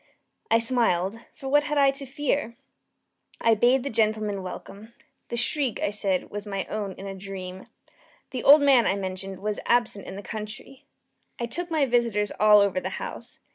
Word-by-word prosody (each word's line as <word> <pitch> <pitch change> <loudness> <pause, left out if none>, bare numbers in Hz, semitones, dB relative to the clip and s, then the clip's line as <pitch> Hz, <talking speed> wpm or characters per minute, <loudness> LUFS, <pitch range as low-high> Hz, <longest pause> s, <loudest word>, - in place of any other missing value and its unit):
I 225 - +5
smiled, 230 -4 +1 0.2
for 270 - -8
what 290 +2 +3
had 295 0 -1
I 275 -1 +5
to 275 0 -7
fear? 275 -3 -2 0.8
I 230 - +4
bade 245 +4 +3
the 280 - -3
gentlemen 215 -2 0
welcome. 200 +4 -9 0.3
The 235 - -3
shriek, 255 +1 +1
I - - 0
said, 195 -3 -1
was 205 0 -6
my 195 -2 -3
own 205 -3 -3
in 195 - -10
a 195 - -5
dream. 190 -1 -8 0.6
The 255 - -3
old 285 +1 +8
man, 270 -4 +5
I - - +2
mentioned, 190 0 -4
was 210 -1 -2
absent 235 -5 +1
in - - -7
the 200 - -8
country. 220 +5 -8 0.5
I 235 - -1
took 345 +10 -4
my 310 -4 +2
visitors 235 -5 +1
all 210 -1 +7
over 195 -2 +1
the - - -4
house. - - -8
220 Hz, 180 wpm, -26 LUFS, 200-255 Hz, 0.8 s, old